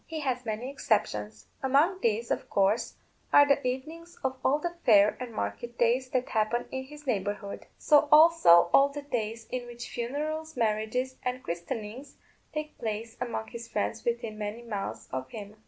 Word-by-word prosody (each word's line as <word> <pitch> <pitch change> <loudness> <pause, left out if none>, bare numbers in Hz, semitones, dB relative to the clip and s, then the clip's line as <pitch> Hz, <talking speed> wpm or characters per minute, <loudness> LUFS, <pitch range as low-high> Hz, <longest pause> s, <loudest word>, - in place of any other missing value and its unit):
He 320 -1 -4
has 255 -3 -2
many 220 +2 -3
exceptions; 110 - -1 0.2
among 290 +8 +3
these, 230 +1 0
of - - -2
course, 200 +4 +1 0.4
are 290 0 +7
the 280 - +3
evenings 315 +7 -5
of 260 0 0
all 275 +3 +3
the 345 +3 -3
fair 210 -2 +6
and 250 -2 -5
market 230 - -4
days 245 +2 +2
that 255 -1 -1
happen 220 +2 0
in 265 0 -4
his 295 +2 -13
neighbourhood; 205 -4 -3
so 295 -1 +4
also 300 - +7
all 275 +1 +6
the 290 +1 -7
days 230 -4 -3
in 250 -1 -3
which 240 0 -8
funerals, 305 +6 -4
marriages, 225 +4 0
and 250 0 -3
christenings 210 +10 -5 0.4
take 305 0 -5
place 225 0 -4
among 235 -3 -3
his 235 -1 -8
friends 225 +1 -2
within 230 -2 -2
many 210 +3 -4
miles 210 -4 -5
of 130 0 -4
him. 205 +3 -9
240 Hz, 170 wpm, -29 LUFS, 215-275 Hz, 0.4 s, are